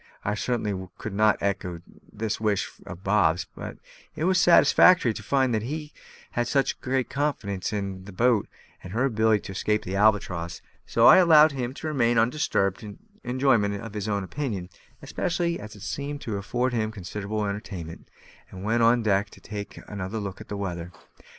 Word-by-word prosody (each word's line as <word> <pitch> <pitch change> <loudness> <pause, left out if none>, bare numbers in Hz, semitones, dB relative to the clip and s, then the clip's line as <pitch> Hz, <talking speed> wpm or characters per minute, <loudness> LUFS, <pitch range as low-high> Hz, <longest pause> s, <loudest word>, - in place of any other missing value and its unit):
I 100 - 0
certainly 105 -4 -2
could 110 - -6
not 105 +1 +3
echo 95 -3 -2 0.3
this 110 0 -3
wish 105 -4 0 0.2
of 90 +2 -9
Bob's; 95 -4 +2
but - - -7 0.4
it - - -3
was 185 +1 +3
satisfactory 175 -5 +6
to 105 - -7
find 130 +3 +1
that 110 - +1
he 150 +5 -5 0.4
had 120 -1 -1
such 135 +1 0
great 130 -1 0
confidence 110 -10 -2
in 100 -3 -4
the 100 - -9
boat 115 +2 +2 0.3
and 90 - -9
in 110 - -4
her 130 - +3
ability 110 -4 +2
to - - -8
escape 105 +3 0
from 90 - -6
the - - -2
Albatross, 95 -5 +1 0.2
so - - +3
I - - +10
allowed 160 -4 +7
him 130 -1 -4
to - - -8
remain 125 -6 +2
in - - 0
undisturbed 115 -5 +1 0.4
enjoyment 120 -5 +2
of 115 -1 -8
his 105 -1 -4
own 100 -2 -1
opinion, 95 -5 -4 0.3
especially 170 -1 -1
as 105 0 -9
it 105 - -12
seemed 145 +5 -4
to 110 - -4
afford 120 +6 -1
him 110 -2 0
considerable 105 +1 -4
entertainment, 95 -5 -6 0.4
and 95 0 -9
went 115 +3 +1
on 115 +1 +4
deck 100 -1 +1
to - - -15
take 105 -1 -7
another 100 +1 -5
look 100 -3 -5
at - - -11
the 105 - -5
weather. 90 -3 -4
110 Hz, 185 wpm, -26 LUFS, 100-125 Hz, 0.4 s, I